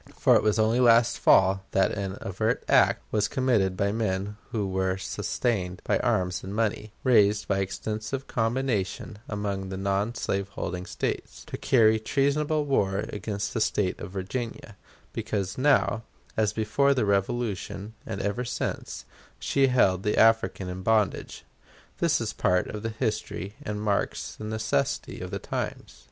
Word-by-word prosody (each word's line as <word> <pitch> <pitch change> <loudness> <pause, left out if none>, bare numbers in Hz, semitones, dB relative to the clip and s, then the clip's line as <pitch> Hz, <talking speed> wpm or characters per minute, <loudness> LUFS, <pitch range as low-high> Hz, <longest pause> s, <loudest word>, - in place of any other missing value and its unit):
For - - +5
it - - +5
was 105 0 +2
only 110 +2 +3
last 115 -1 +5
fall 95 0 +5
that 95 - +3
an 100 -1 -4
overt 110 +5 -1
act - - +4
was 105 -1 +2
committed 115 -9 +1
by 100 +1 +1
men 105 -2 -1
who 105 -3 -1
were 95 0 0
sustained 95 -1 -2
by - - +1
arms 90 -1 0
and 95 +2 -6
money, 110 -1 -1
raised 105 -4 +4
by 100 -1 +1
extensive 110 +7 -3
combination 115 -4 -1
among 100 -2 -3
the 95 - -4
non 100 +4 0
slaveholding 95 -3 -3
States, - - -4
to - - -6
carry 110 -3 +4
treasonable 145 +5 +1
war 100 -8 +1
against 100 -1 -4
the 115 - -1
State 100 -3 0
of - - -6
Virginia, 105 +3 -5 0.4
because 105 -4 -2
now, 130 -4 +3 0.3
as 110 -1 +2
before 115 +6 +2
the 125 - +1
Revolution, 100 0 -1
and 100 - -4
ever 105 +5 -1
since, 120 - -4 0.3
she 135 -1 +2
held 95 -8 +3
the 105 - 0
African 110 -4 +3
in 90 +1 -5
bondage. 110 -1 0 0.5
This - - +2
is - - -3
part 90 0 +2
of 105 - -5
the 115 - -2
history 110 -3 -3
and 105 0 -4
marks 105 -1 -1
the 110 - -8
necessity 110 -9 -1
of - - -5
the - - -3
times. - - -5
105 Hz, 155 wpm, -27 LUFS, 95-115 Hz, 0.5 s, For